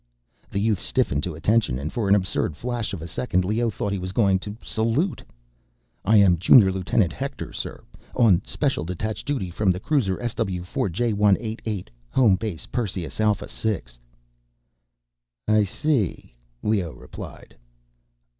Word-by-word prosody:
The 100 - -2
youth 105 -2 +1
stiffened 70 - 0
to 90 -4 -4
attention 100 - +2
and 70 +4 -5
for 110 -4 -1
an 100 - +7
absurd 95 -6 0
flash 120 -2 -3
of 85 -5 -5
a - - -6
second, 95 0 0
Leoh 115 +4 +1
thought 100 -1 -3
he 100 - -2
was 90 +1 -5
going 100 -3 +3
to 105 +2 -7
salute. 115 - 0 0.8
"I 105 +3 +5
am 95 -4 +5
Junior 95 +1 +7
Lieutenant 90 -1 +1
Hector, - - -5
sir; - - -6 0.3
on 110 -8 +5
special - - -1
detached 100 - -4
duty 125 -11 -2
from 100 +3 +1
the 90 - -2
cruiser 105 -7 +1
SW4 95 -6 -2 0.2
J188, 105 0 0 0.2
home 120 -8 +4
base 95 -5 -4
Perseus 95 -9 -3
Alpha 105 -1 +2
VI." 110 -3 -2 1.6
"I 110 0 +4
see," 115 - -1 0.3
Leoh 100 -7 0
replied. - - -11
100 Hz, 145 wpm, -24 LUFS, 90-110 Hz, 1.6 s, an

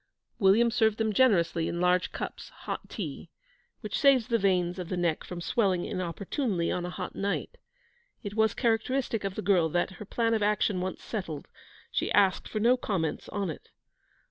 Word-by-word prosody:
William 220 +4 +5
served 220 -1 +2
them 220 -1 0
generously, 170 -9 +3
in 170 - -3
large 180 0 +2
cups, - - -6 0.2
hot - - -5
tea, - - -6 0.5
which - - -3
saves 270 -5 +4
the 230 -1 +2
veins 180 -2 +1
of 180 -1 -5
the 185 - -2
neck 170 -3 0
from 180 - -7
swelling 185 -1 +1
inopportunely 185 - -2
on 175 0 -2
a - - -4
hot - - -5
night. 200 0 -3 0.6
It 205 -1 -5
was 220 -1 +2
characteristic 235 -1 0
of 195 -1 -3
the - - -4
girl 180 -4 +3
that, 175 +4 0
her - - -5
plan 230 +2 0
of 220 - +1
action 205 -2 +1
once 185 0 -4
settled, 165 -10 -5 0.4
she - - -1
asked 195 -2 +3
for 215 - -3
no 240 +4 +4
comments 185 -10 -2
on 200 -4 -2
it. - - -11
195 Hz, 180 wpm, -28 LUFS, 180-225 Hz, 0.6 s, William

